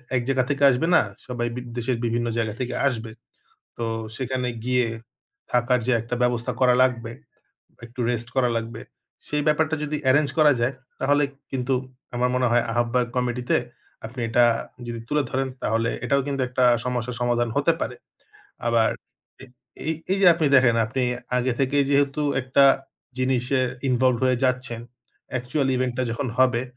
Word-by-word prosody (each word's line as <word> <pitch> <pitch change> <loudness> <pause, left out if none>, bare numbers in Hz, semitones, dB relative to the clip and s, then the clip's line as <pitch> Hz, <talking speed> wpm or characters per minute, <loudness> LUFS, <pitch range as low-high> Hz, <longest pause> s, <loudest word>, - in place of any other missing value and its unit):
এক 125 - +2
জায়গা 130 -2 +2
থেকে 145 0 0
আসবে 130 +6 +1
না। - - +7 0.3
সবাই 120 -1 -2
বি 125 - -4 0.2
দেশের 120 0 -1
বিভিন্ন 120 +1 0
জায়গা 110 -2 -1
থেকে 125 -1 -3
আসবে। 115 -4 -3 0.7
তো 115 - -2 0.3
সেখানে 130 0 -2 0.2
গিয়ে 125 -1 +2 0.7
থাকার 125 +1 +3
যে 130 - +2
একটা 115 +2 -4
ব্যবস্থা 125 0 0
করা 125 -1 +5
লাগবে, 120 -3 0 0.7
একটু 120 +1 -9
রেস্ট 115 -1 -3
করা 125 -2 +3
লাগবে। 115 0 -4 0.5
সেই 150 0 -1
ব্যাপারটা 155 +1 +2
যদি 150 0 -2
এরেঞ্জ 145 +1 +4
করা 150 -1 +6
যায়, 125 +3 +1 0.3
তাহলে 145 +2 +3 0.3
কিন্তু 130 0 -1 0.4
আমার 125 +1 +1
মনে 125 0 +2
হয় 120 0 +3
আহ্বায়ক 120 0 0
কমিটিতে 125 0 0 0.5
আপনি 120 +2 -8
এটা 120 +2 +4 0.4
যদি 115 -1 -5
তুলে 150 0 +2
ধরেন 135 0 -1
তাহলে 115 +1 +1
এটাও 140 0 +2
কিন্তু 140 -2 -1
একটা 125 0 +1 0.2
সমস্যার 125 -1 -3
সমাধান 120 -1 +1
হতে 145 +4 +3
পারে। 125 - -3 0.7
আবার 115 -1 +3 0.5
এ - - -9 0.4
এই, 160 - +1 0.2
এই 195 - +2
যে 185 - +7
আপনি 160 -2 0
দেখেন 125 -3 +5
আপনি 130 +3 -2 0.3
আগে 125 +1 +1
থেকেই 140 +1 +2
যেহেতু 140 +1 +2 0.2
একটা 130 +2 +4 0.5
জিনিসে 130 0 +1 0.3
ইনভলভড 125 -1 +2
হয়ে 130 -1 +2
যাচ্ছেন 125 -2 0 0.5
অ্যাকচুয়াল 130 +3 -1
ইভেন্টটা 130 0 -1
যখন 130 +3 -3
হবে, 125 -2 +3
125 Hz, 160 wpm, -24 LUFS, 120-135 Hz, 0.7 s, না